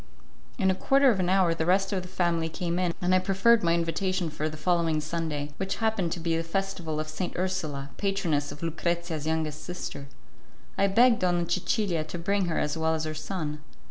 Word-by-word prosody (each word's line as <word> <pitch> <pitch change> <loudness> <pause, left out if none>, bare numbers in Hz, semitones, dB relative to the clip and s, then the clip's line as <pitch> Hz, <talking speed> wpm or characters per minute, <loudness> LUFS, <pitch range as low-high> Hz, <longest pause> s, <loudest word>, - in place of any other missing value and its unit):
In 190 -5 +3
a - - +2
quarter 270 +7 +4
of 200 - -1
an 180 -1 +1
hour 185 -3 +4
the 160 0 -2
rest 195 +2 +2
of 190 - 0
the 180 - -9
family 170 -3 0
came 170 +2 -2
in, 180 -2 +1
and 180 +1 +3
I 185 - +6
proffered 195 +5 +4
my 170 -1 +3
invitation 170 +1 -1
for 155 0 -2
the 155 - -8
following 170 -2 +1
Sunday, 150 -2 -3
which 195 0 -2
happened 220 -6 0
to - - -5
be 165 0 0
the 165 - 0
Festival 170 -3 -3
of 155 - -3
St. 165 +4 -4
Ursula, 160 -7 -2
patroness 175 -8 0
of 150 - -9
Lucrezia's 165 -1 -2
youngest 155 -1 -1
sister. 175 -5 -6 0.7
I 200 - +3
begged 235 +4 +5
Donna 175 -2 +1
Cecilia 185 -3 0
to 165 - -6
bring 200 +3 0
her 165 -2 -1
as 150 - 0
well 160 0 +1
as 160 - -2
her 155 0 -3
son. 155 -3 -4
170 Hz, 205 wpm, -27 LUFS, 160-190 Hz, 0.7 s, I